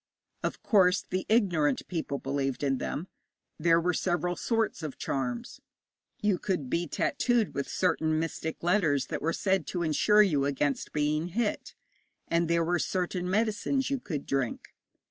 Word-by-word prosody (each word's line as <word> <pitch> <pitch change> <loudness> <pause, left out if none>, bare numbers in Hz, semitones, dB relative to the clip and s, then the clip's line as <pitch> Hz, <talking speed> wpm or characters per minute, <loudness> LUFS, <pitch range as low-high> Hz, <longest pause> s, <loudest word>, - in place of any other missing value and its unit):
Of - - -3
course, 190 -2 +4
the 185 0 -3
ignorant 175 - +2
people 160 -5 -3
believed 135 0 -2
in 135 -2 +1
them. 165 +6 -3 0.5
There 165 +1 +4
were 180 +1 +1
several 175 0 0
sorts 225 +1 -1
of 155 -4 -5
charms. 125 -3 -3 0.6
You 205 -4 +2
could 165 -10 -2
be 170 +1 0
tattooed 240 - +1
with 140 - -3
certain 160 -3 +1
mystic 160 0 -3
letters 160 -7 +2
that - - -3
were 165 - +1
said 190 -1 0
to 175 -2 -2
insure 210 +7 +5
you 150 -8 +1
against 140 0 -1
being 150 +2 0
hit, 210 +4 -2 0.5
and 170 0 +1
there 170 0 +2
were 175 +1 +1
certain 180 0 -1
medicines 225 +6 0
you 275 - 0
could 155 - -5
drink. 135 -3 -2
170 Hz, 155 wpm, -29 LUFS, 150-190 Hz, 0.6 s, insure